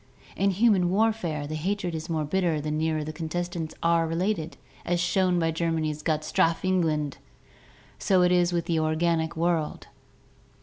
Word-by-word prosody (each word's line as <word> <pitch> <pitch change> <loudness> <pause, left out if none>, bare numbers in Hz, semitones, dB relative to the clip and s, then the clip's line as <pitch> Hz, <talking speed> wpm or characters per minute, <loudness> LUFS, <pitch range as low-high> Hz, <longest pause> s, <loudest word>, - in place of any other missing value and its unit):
In 200 - +2
human 195 -2 +3
warfare, 190 -7 0
the 150 - -6
hatred 180 +3 -2
is 160 +1 -5
more 155 -2 -1
bitter 170 -1 0
the 150 +1 -3
nearer 155 0 0
the 155 +1 -6
contestants 165 0 -4
are 165 0 +3
related, 165 0 -2 0.3
as 175 0 0
shown 180 +1 +2
by 165 -1 +1
Germany's 160 -2 -1
"Gott 155 -1 0
strafe 165 +3 +1
England!"; 160 -6 0 0.8
so 185 -2 +3
it 180 - +3
is 175 -1 +3
with 170 -1 -1
the 165 -2 0
organic 160 +1 0
world. 165 -2 -1
165 Hz, 160 wpm, -26 LUFS, 155-180 Hz, 0.8 s, human